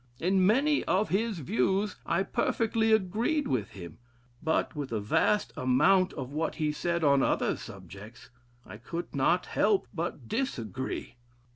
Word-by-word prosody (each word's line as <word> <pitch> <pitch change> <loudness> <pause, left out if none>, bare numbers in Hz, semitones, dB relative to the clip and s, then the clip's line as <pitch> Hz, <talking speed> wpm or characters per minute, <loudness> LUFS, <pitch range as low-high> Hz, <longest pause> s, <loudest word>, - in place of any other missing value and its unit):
In 185 +1 +3
many 285 +7 +3
of 195 +3 +1
his 215 +1 0
views 185 - 0
I 180 +3 +1
perfectly 225 +2 0
agreed 220 - +1
with 110 -6 -1
him? 85 -3 -10 0.4
but 160 0 0
with 145 -4 -5
a 110 - -1
vast 150 - +1
amount 155 +9 +3
of 135 -1 -6
what 155 +2 -2
he 155 -2 0
said 170 +2 -2
on 140 -2 +4
other - - +1
subjects, 105 +5 -11 0.3
I 100 - -10
could 170 +10 -6
not 170 +7 +2
help 205 -2 +1
but 160 -8 -4
disagree.... 130 - -4
170 Hz, 145 wpm, -29 LUFS, 130-205 Hz, 0.4 s, on